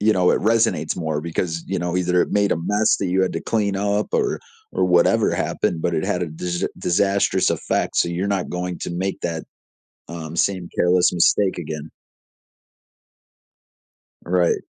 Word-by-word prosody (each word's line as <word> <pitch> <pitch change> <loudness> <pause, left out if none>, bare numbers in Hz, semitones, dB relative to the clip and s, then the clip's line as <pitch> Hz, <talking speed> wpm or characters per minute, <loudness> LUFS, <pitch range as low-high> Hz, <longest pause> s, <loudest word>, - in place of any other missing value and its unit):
you 110 +1 +4
know, 90 -2 +3
it - - +2
resonates 110 -8 +2
more 80 -3 -2
because, 85 0 -3
you 95 - -2
know, 85 +1 -2
either 90 0 +2
it - - -4
made 100 -1 +2
a - - 0
mess 105 +6 +2
that 100 - -1
you 95 +1 +2
had 95 - 0
to - - -3
clean 105 -3 0
up 100 +1 0
or 415 -2 +1 0.3
or - - +1
whatever 90 -1 +3
happened, 85 - -1
but 85 - 0
it 80 - 0
had 90 - -1
a - - -1
dis 85 +3 -3
disastrous 100 +3 +2
effect, - - -1
so - - +3
you're 90 +3 -2
not 95 -2 -1
going 90 0 -3
to - - -5
make 95 +2 -2
that, 80 -2 -3 0.6
um, 85 -1 -7
same 95 -1 0
careless 90 0 +3
mistake 95 +2 +2
again. 80 -2 -5 2.4
Right. 90 -1 +1
90 Hz, 175 wpm, -22 LUFS, 85-100 Hz, 2.4 s, you